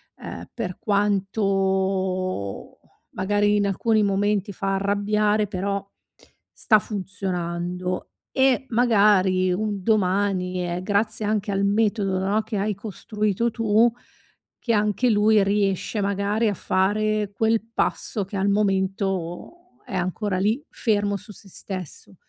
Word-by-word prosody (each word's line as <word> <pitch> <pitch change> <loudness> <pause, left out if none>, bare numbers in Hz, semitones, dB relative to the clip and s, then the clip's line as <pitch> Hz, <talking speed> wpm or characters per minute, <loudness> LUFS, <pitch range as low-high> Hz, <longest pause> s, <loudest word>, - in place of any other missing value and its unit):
ehm, - - -8
per 200 -7 -4
quanto, 190 - 0 0.3
magari 205 +2 +1
in 205 - +2
alcuni 215 +2 +2
momenti 200 0 +1
fa 195 +1 -2
arrabbiare, 210 +2 +1
però 200 +1 -2 0.7
sta 215 -3 +3
funzionando. 180 -3 -3 0.3
E 265 0 +3
magari, 200 -6 +3
un 205 +1 -2
domani, 185 -3 +1
e 175 +1 -3
grazie 210 +2 0
anche 210 -1 0
al 195 0 +1
metodo 205 -2 +1
no, 200 +3 +1
che 220 0 -5
hai 205 +1 -1
costruito 210 +2 -2
tu, 225 +1 +3 0.7
che 235 - -2
anche 210 +3 +2
lui 210 -1 +4
riesce 200 +1 0
magari 200 +3 0
a 205 - +1
fare 205 +3 0
quel 225 +2 +2
passo 210 -1 -1
che 195 +2 -6
al 195 +1 +1
momento 195 - -2
è 195 - -6
ancora 185 +2 -1
lì, 220 +9 +1
fermo 205 -2 0
su 210 +2 -12
se 195 - -13
stesso. 185 -1 -5
200 Hz, 120 wpm, -24 LUFS, 190-215 Hz, 0.7 s, lui